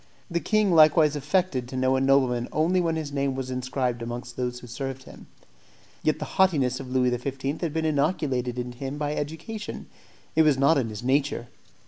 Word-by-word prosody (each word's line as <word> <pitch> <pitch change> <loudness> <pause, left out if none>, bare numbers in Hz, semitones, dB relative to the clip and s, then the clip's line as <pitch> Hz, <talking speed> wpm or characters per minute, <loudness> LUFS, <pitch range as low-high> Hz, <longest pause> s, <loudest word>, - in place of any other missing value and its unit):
The 170 - +1
king 215 -1 +2
likewise 155 -1 +6
affected 145 -3 0
to 130 - -6
know 130 +1 +2
a 130 - +1
nobleman 130 -3 +2
only 175 +4 +2
when 165 -2 0
his 155 -3 -4
name 140 -1 -1
was 130 -1 -4
inscribed 125 -1 -2
amongst 120 +1 -6
those 125 -1 -3
who 125 - -12
served 135 +2 -5
him. - - -13 0.7
Yet 155 - +1
the 150 - -4 0.2
haughtiness 140 -9 +3
of 135 -2 -7
Louis 125 -1 +2
XV. 135 +2 -5 0.2
had 170 -3 -1
been 160 +1 -1
innoculated 140 -5 0
into 125 0 -5
him 135 +1 -4
by 150 0 -1
education; 160 +9 -5 0.5
it 160 - +5
was 150 -4 +4
not 140 +2 +4
in 115 -4 -2
his 110 +1 -7
nature. 130 -2 0
135 Hz, 190 wpm, -26 LUFS, 125-155 Hz, 0.7 s, likewise